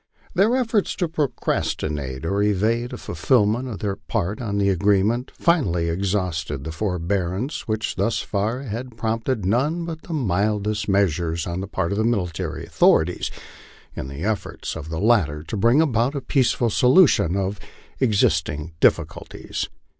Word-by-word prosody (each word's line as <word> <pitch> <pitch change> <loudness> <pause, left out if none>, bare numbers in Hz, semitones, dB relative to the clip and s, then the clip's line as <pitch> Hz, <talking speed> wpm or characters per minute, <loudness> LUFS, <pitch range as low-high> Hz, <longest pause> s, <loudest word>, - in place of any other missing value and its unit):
Their 205 +7 +3
efforts 230 -5 +1
to 175 - 0
procrastinate 75 - -2
or 100 +4 0
evade 110 +4 +1
a - - -5
fulfilment 120 0 +1
of 115 -5 -5
their 100 -2 -2
part 105 0 -3
of 105 -4 -2
tho 100 - +2
agreement 100 +6 +2
finally 90 - +1
exhausted 85 -6 -2
the 80 - -5
forbearance 95 - -2
which 110 0 -2
thus 115 - +1
far 110 +6 -2
had 120 0 -6
prompted 115 0 -1
none 145 - +1
but 160 -1 -6
the 170 - -7
mildest 105 - 0
measures 85 -4 +1
on 85 +1 -3
the 95 - -5
part 85 -3 -2
of 100 - -1
the - - +2
military 100 -8 -2
authorities, - - +3 0.7
in - - -5
the 70 +4 -7
efforts 110 0 -3
of 75 - -7
the 80 0 -3
latter 95 -10 +2
to 85 - -5
bring 115 +8 +4
about 130 -2 +1
a 140 - -2
peaceful 125 -4 +1
solution 125 - +5
of 100 +1 -2 0.4
existing 80 - +1
difficulties. - - 0
105 Hz, 150 wpm, -23 LUFS, 90-120 Hz, 0.7 s, solution